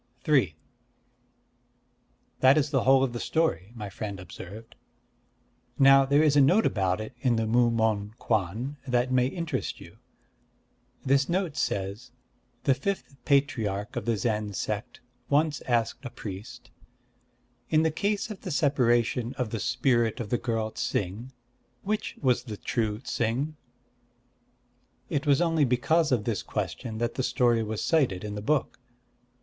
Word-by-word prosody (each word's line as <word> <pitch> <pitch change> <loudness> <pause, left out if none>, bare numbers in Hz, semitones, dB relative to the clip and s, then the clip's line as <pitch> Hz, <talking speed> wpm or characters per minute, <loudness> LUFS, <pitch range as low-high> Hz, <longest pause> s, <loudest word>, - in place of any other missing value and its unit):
III 130 - +3 1.8
"That 130 +3 +6
is 145 -1 +1
the 135 -4 +1
whole 135 0 +6
of 130 -3 -1
the 120 - -4
story," 115 - 0
my 105 -3 -6
friend 100 0 -6
observed. 100 +4 -10 1.0
"Now 135 0 +7
there 145 +2 +4
is 150 -2 +3
a 145 - +6
note 185 +11 +4
about 95 -1 +1
it 110 +3 -6
in 120 -2 +2
the 115 0 0
Mu 120 +2 +3
Mon 110 -2 0
Kwan 110 +7 -1
that 125 0 +1
may 125 -1 +3
interest 170 +3 -3
you. - - -14 1.1
This 135 +2 +3
note 175 -4 -1
says: 115 -3 -2 0.5
'The 135 - +4
fifth 190 -1 -3
patriarch 115 -8 0
of - - -3
the 115 -2 +1
Zen 105 -2 -1
sect 105 +2 -4 0.3
once 150 +1 +2
asked 120 +1 0
a 125 - -5
priest, 115 +2 -9 1.0
"In 155 0 +3
the 160 - +2
case 205 +6 -1
of 205 - -8
the 190 - -6
separation 125 -4 +1
of 125 -5 -2
the 115 - -2
spirit 120 - +1
of 110 -3 -5
the 120 - +1
girl 115 -2 -2
Ts'ing, 105 +8 -3 0.5
which 215 +2 -2
was 125 -2 +2
the 110 -4 -6
true 110 -2 -1
Ts'ing?"' 130 +5 -1 1.6
It 145 -1 -1
was 140 +1 +4
only 165 -3 +2
because 145 +5 +2
of 120 -5 +2
this 110 -2 -1
question 105 - -4
that 120 +1 -1
the - - -2
story 120 -2 +2
was 110 -1 -3
cited 130 - +1
in 105 -1 -5
the 105 - -5
book. 140 +3 0
120 Hz, 150 wpm, -27 LUFS, 110-140 Hz, 1.8 s, Now